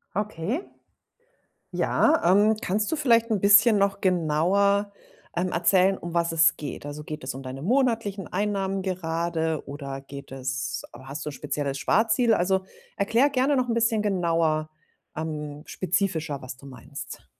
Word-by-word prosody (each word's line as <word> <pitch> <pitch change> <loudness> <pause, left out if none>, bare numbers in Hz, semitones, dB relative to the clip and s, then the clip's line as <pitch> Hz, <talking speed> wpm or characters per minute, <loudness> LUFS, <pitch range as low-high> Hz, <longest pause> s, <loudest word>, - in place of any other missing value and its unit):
Okay. 210 - -2 1.1
Ja, 320 +2 +2
ähm, 210 +3 +4
kannst 210 +3 -1
du - - +2
vielleicht 230 -6 +3
'n 210 -3 +1
bisschen 205 +2 +6
noch 200 0 +1
genauer, 190 +4 +2 0.4
ähm, 180 +1 -1
erzählen 185 +3 +3
um 175 - -7
was 170 0 +1
es 160 -1 +4
geht? 145 -1 -7
Also, 145 +1 -6
geht 150 -2 -7
es 130 - -4
um 135 - -7
deine 130 +1 -7
monatlichen 225 - 0
Einnahmen 195 -1 -1
gerade 165 -3 -2
oder 140 -1 -6
geht 140 0 -10
es 130 0 -4
hast 135 +5 -8
du 150 - -3
'n - - -10
spezielles 140 0 -3
Sparziel? 225 - +2
Also, 190 0 +1 0.3
erkläre 230 +8 +3
gerne 275 +1 +2
noch 255 -1 +1
'n 230 - +1
bisschen 230 -2 +2
genauer, 165 -5 +1 0.5
ähm 150 -2 -5
spezifischer, 170 -6 -1
was 130 -1 -7
du 140 - -13
meinst. 135 +2 -9
180 Hz, 150 wpm, -25 LUFS, 150-205 Hz, 1.1 s, bisschen